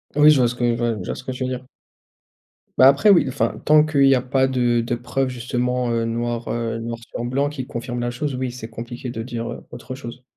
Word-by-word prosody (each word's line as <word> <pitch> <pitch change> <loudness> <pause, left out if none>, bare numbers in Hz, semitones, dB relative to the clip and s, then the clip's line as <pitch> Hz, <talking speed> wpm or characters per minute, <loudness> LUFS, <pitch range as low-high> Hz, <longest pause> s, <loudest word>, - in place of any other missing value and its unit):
Oui 150 +1 +7
je 150 - +6
vois 120 - +4
ce 125 - -5
que 125 - -4
ouais, 120 -1 +1
je - - -6
vois - - -3
ce 125 - -9
que 130 - -4
tu 130 0 -4
veux 130 - -1
dire. 130 0 -5 1.1
Bah 130 - +8
après 140 +10 +5
oui, 180 -6 +6
enfin, 130 +2 -1
tant 150 0 +6
qu'il 140 -3 +3
y 135 - +6
a 125 - +1
pas 130 +1 +1
de 120 -2 +1
de 120 +1 -1
preuves 125 +3 -2
justement, 125 0 -1
heu, 115 0 0
noir, 120 0 -2
heu, 115 -1 -2
noir 115 0 -4
sur 120 +1 -6
blanc 140 +4 0
qui 130 -4 -6
confirme 120 +1 -5
la 120 0 -1
chose, 140 +3 -3
oui 130 0 -2
c'est 120 -2 -8
compliqué 120 +2 -7
de 115 -2 -5
dire, 120 -1 -5
heu, - - -9
autre 120 +2 -8
chose. 125 -1 -9
125 Hz, 255 wpm, -22 LUFS, 120-130 Hz, 1.1 s, Bah